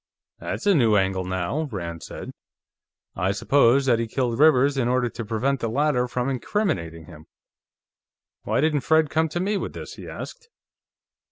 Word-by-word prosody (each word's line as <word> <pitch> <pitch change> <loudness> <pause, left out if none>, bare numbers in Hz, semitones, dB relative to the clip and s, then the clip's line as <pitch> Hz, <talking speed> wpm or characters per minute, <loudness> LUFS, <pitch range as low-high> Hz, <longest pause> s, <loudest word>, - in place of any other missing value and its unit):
"That's - - -5
a 205 - +5
new 115 - +4
angle, 95 -2 +1
now," 95 - -2
Rand 85 -5 -5
said. - - -8 0.8
"I 90 +2 0
suppose 135 +5 +3
that 120 -3 +3
he 115 - -1
killed 120 0 -2
Rivers 145 -2 +5
in 130 -3 0
order 125 -1 +1
to 115 - -6
prevent 120 +5 -1
the 115 - -2
latter 130 0 +1
from 125 +1 -2
incriminating 130 - -2
him. 80 0 -14 1.1
Why - - 0
didn't 150 -2 +1
Fred 160 +1 +2
come 160 0 +1
to 175 - -3
me 200 +3 0
with - - -5
this?" - - -8
he - - -9
asked. 460 - -9
125 Hz, 170 wpm, -24 LUFS, 105-150 Hz, 1.1 s, a